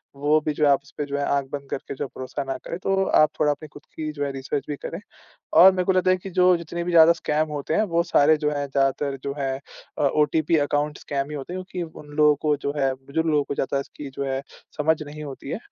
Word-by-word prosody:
वो 145 +2 +3
भी 155 - 0
जो 150 +1 +1
है 145 - +6
आप 140 - +4
उसपे 145 0 -6
जो 140 0 -3
है 145 - 0
आँख 140 -1 0
बंद 140 -1 -6
करके 140 - -5
जो 145 - -3
भरोसा 130 +2 -5
ना 135 -1 -4
करे, 170 - -6
तो 195 +1 +1
आप 155 -4 +4
थोड़ा 150 -1 +3
अपनी 150 +2 -6
खुद 145 - -13
की 155 -1 -3
जो 145 -1 -4
है 140 - -2
रिसर्च 135 +1 -3
भी 145 - -2
करें। 165 +5 -6 0.6
और 190 +1 +10
मेरे 180 -1 -1
को 190 - +3
लगता 185 0 +3
है 185 - +4
कि 185 +1 -9
जो 180 0 +4
जितने 170 +1 -5
भी 180 - -2
ज़्यादा 165 0 +8
स्कैम 155 -1 -1
होते 150 +1 -3
हैं 215 - +3
वो 170 - +5
सारे 155 +2 +5
जो 150 -1 0
हैं 145 -1 -2
ज़्यादातर 135 +1 0
जो 140 0 -3
है 135 -1 -1 0.4
अ, - - 0
ओटीपी 155 +3 +2
अकाउंट 150 0 -1
स्कैम 140 -1 -3
ही - - -5
होते 145 +6 -6
हैं 185 - -4
क्योंकि 170 -3 -6
उन 145 -1 -14
लोगों 150 -1 +6
को 150 -2 +2
जो 140 - 0
है 135 -1 +2
बुजुर्ग 140 +5 -3
लोगों 150 -2 +2
को - - -4
ज़्यादा 135 0 -1
इसकी 140 0 -9
जो 140 - -1
है 135 - -2 0.3
समझ 155 +1 +1
नहीं 150 +1 -8
होती 135 -1 -8
है 185 - -2
150 Hz, 265 wpm, -24 LUFS, 140-160 Hz, 0.6 s, और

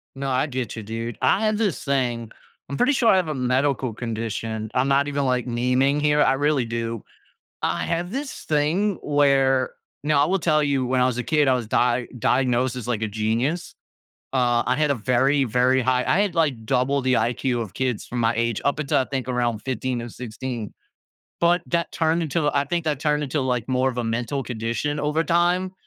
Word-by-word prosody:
No, 135 0 -3
I 130 +3 +1
get 125 -5 -4
you, 110 - -5
dude. 115 +2 -5
I 220 - +3
have 215 0 +1
this 205 -7 -1
thing 120 -5 -1 0.4
I'm 140 - -4
pretty 260 +4 +3
sure 240 -4 +2
I 190 - +5
have 180 -4 +1
a 155 - -2
medical 130 0 0
condition. 110 -1 -4
I'm 130 +2 +1
not 140 +1 +3
even, 140 -1 -1
like, 125 0 0
naming 125 +4 +1
here, 150 0 +3
I - - +3
really 145 -2 +1
do. 115 -1 -4 0.6
I - - -1
have 170 +1 -2
this 275 +2 -5
thing 165 +7 +1
where 135 -3 +3 0.3
now 145 -1 +3
I - - +3
will 190 +3 +1
tell 155 -2 +2
you 140 -3 +1
when 130 0 +1
I - - +4
was 125 -1 0
a - - -1
kid, 150 -3 +2
I 130 - +5
was 120 -4 -3
di 120 +1 +1
diagnosed 125 +1 +1
as 120 - -6
like 115 -3 -1
a - - 0
genius. 115 - -1 0.6
Uh, 120 -2 +2
I 125 - +1
had 150 0 +1
a - - +1
very 130 +5 +2
very 125 +3 +2
high 125 0 +1
I 195 - +3
had, 200 -4 0
like, 140 -9 0
double 135 +3 +1
the 130 0 +1
IQ 120 +1 0
of 105 -5 -6
kids 130 -4 -2
from 120 - -4
my 115 0 +2
age 115 -1 -1
up 140 +1 +1
until 145 - +1
I 130 - 0
think 130 -1 -4
around 120 -3 0
15 125 0 -3
or 120 - -7
16. 120 -1 -6 0.7
But 170 +1 +3
that 170 -1 -1
turned 165 +1 +1
into 150 0 0
I 140 0 +1
think 170 +3 -1
that 150 -3 0
turned 150 -1 +1
into 145 +2 -2
like 125 -2 -1
more 130 +1 +2
of 125 - -7
a 120 - -1
mental 120 +4 -2
condition 120 +5 -3
over 150 +2 0
time, 175 +2 +1
130 Hz, 215 wpm, -23 LUFS, 120-150 Hz, 0.7 s, I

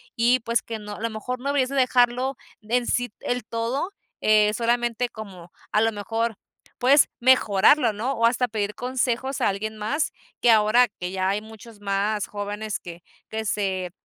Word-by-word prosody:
y 245 +2 +3
pues 230 0 0
que 225 -1 -6
no 210 -1 -7
a - - -10
lo 230 - -1
mejor 235 +3 -5
no 265 - -5
deberías 275 -3 +1
de 275 - -4
dejarlo 255 0 +2 0.2
en 240 +3 0
sí 245 -2 0
el 245 0 -2
todo, 230 - -2 0.3
eh, 210 -1 +4
solamente 240 +1 0
como 190 -7 -10 0.2
a 215 - +4
lo 225 0 +3
mejor 225 +2 -2 0.4
puedes 270 +3 +5
mejorarlo, 240 0 +4
¿no? 225 +6 -2
O 230 -3 +1
hasta 250 +1 +1
pedir 210 -2 -3
consejos 255 +1 -1
a - - +3
alguien 215 +2 -3
más, 220 +9 -1 0.3
que 240 - +6
ahora 220 +3 +5
que 180 -4 -7
ya 185 0 -1
hay 200 +2 0
muchos 220 0 -13
más 205 +1 -1
jóvenes 205 +1 -4
que 170 0 -10 0.3
que 220 0 -3
se, 190 -4 -2
225 Hz, 180 wpm, -24 LUFS, 210-245 Hz, 0.4 s, que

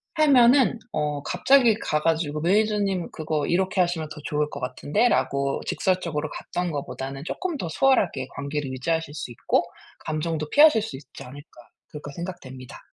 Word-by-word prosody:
하면은 265 -4 +5
어 150 -1 -2
갑자기 235 +3 +4
가 150 -7 -1
가지고 155 -2 0
"매니저님 200 0 +1
그거 155 -2 -2
이렇게 190 +2 0
하시면 165 -3 -1
더 150 - -9
좋을 150 0 -1
것 140 - -6
같은데."라고 140 - 0
직설적으로 170 -5 -1
갔던 180 +2 -4
것보다는 135 -1 -5
'쪼끔 355 - -3
더 175 - -4
수월하게 185 - +2
관계를 145 -1 -3
유지하실 160 +3 -2
수 130 - -6
있고 - - 0 0.4
감정도 155 0 -2
피하실 290 -7 +6
수 140 -11 -6
있지 135 - -12
않을까.' 130 -2 -14 0.2
그렇게 145 -1 -8
생각됩니다. 135 -8 -8
160 Hz, 370 characters per minute, -24 LUFS, 145-195 Hz, 0.4 s, 피하실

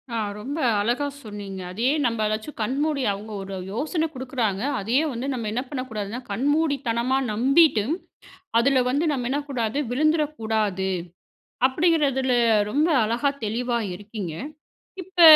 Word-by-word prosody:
ஆ - - 0 0.2
ரொம்ப 265 +8 -5 0.2
அழகா 240 +7 +1 0.2
சொன்னீங்க. 205 -4 -7
அதேயே 235 +9 +1
நம்ம 230 -3 +1
ஏதாச்சும் 215 +7 -3
கண்மூடி 275 +5 0
அவுங்க 205 +2 -6
ஒரு 195 0 -6 0.2
யோசனை 310 - -1
கொடுக்குறாங்க 250 -7 -2 0.2
அதேயே 235 +9 +2
வந்து 245 +3 -3
நம்ம 235 -4 -3
என்ன 240 +3 -1
பண்ணக் 260 -3 -4
கூடாதுனா, 215 +1 -4
கண்மூடித்தனமா 265 -1 +1
நம்பிட்டு 260 +1 +4 0.8
அதில 260 +1 +4
வந்து 285 +5 +1
நம்ம 250 -4 -1
என்னக்கூடாது 275 -4 -1
விழுந்துறக்கூடாது. 225 - +1 0.8
அப்பிடிங்கிறதில 275 -3 +2 0.4
ரொம்ப 300 +6 +3
அழகா 235 +6 +1 0.2
தெளிவா 240 +3 0 0.2
இருக்கீங்க. 205 -3 -6 0.7
இப்ப 360 0 -1
250 Hz, 120 wpm, -24 LUFS, 215-285 Hz, 0.8 s, நம்பிட்டு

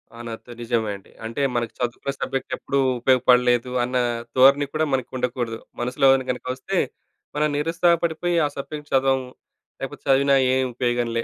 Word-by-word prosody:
ఆ! - - -11
నాతో 115 +2 -8
నిజమే 115 -3 0
అండి. 95 - -21
అంటే 115 +5 -3
మనకి 120 -2 -1
చదువుకునే 125 +3 -2
సబ్జెక్ట్ 135 - -3
ఎప్పుడూ 140 - -1 0.2
ఉపయోగపడలేదు 125 -1 +3
అన్న 125 +1 -1 0.4
ధోరణి 140 +2 +6
కూడా 155 0 +1
మనకు 130 -2 -1
ఉండకూడదు. 120 -2 -2 0.2
మనసులోని 130 +2 +3
గనక 125 - -7
ఒస్తే 130 - -3 0.6
మనం 150 +1 +2
నిరుత్సాహ 165 +3 +2
పడిపోయి 170 +1 0
ఆ - - +2
సబ్జెక్ట్ 150 +1 -7
చదవం, 135 0 +3 0.6
లేపోతే - - -6
చదివినా 140 +1 +5 0.2
ఏ - - +3 0.2
ఉపయోగంలే! 120 -1 -1
130 Hz, 150 wpm, -23 LUFS, 120-140 Hz, 0.6 s, ధోరణి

